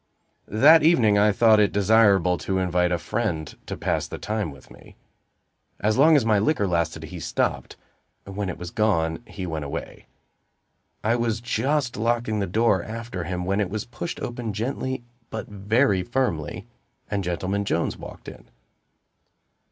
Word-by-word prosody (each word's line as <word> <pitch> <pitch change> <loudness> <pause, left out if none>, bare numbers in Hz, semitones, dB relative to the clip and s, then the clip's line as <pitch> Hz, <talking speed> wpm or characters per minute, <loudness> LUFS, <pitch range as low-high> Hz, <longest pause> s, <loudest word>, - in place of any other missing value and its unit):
That 145 +10 +6
evening 120 -11 +4
I 105 +1 +5
thought 110 +1 +5
it 105 -1 +3
desirable 100 -4 +4
to 95 - -2
invite 90 -1 +1
a 90 - +2
friend 85 -3 -3
to - - -5
pass - - -1
the - - -7
time 105 -4 -2
with 70 - -14
me. - - -16 0.8
As 105 +1 +1
long 155 +4 +6
as 135 -6 +3
my 110 -2 +3
liquor 105 -1 +1
lasted 85 -2 -1
he - - -8
stopped; - - -2 0.5
when 100 0 -4
it - - -5
was 90 0 -7
gone, 80 -7 +1
he 95 - -6
went 80 -3 -4
away. 70 - -7 1.0
I 110 +3 +2
was 115 -2 -1
just 120 +3 -1
locking 115 -1 0
the 100 - -1
door 105 0 +2
after 110 -4 -6
him, 90 +1 -3
when 100 +2 0
it 100 - -1
was 105 0 -4
pushed 125 +8 -6
open 120 -3 -4
gently, 130 +3 -3 0.3
but 110 - -5
very 105 +1 +1
firmly, 105 - -2 0.5
and 100 -1 -1
Gentleman 95 +3 -2
Jones 85 -4 -1
walked - - -11
in. - - -11
105 Hz, 160 wpm, -24 LUFS, 90-115 Hz, 1.0 s, That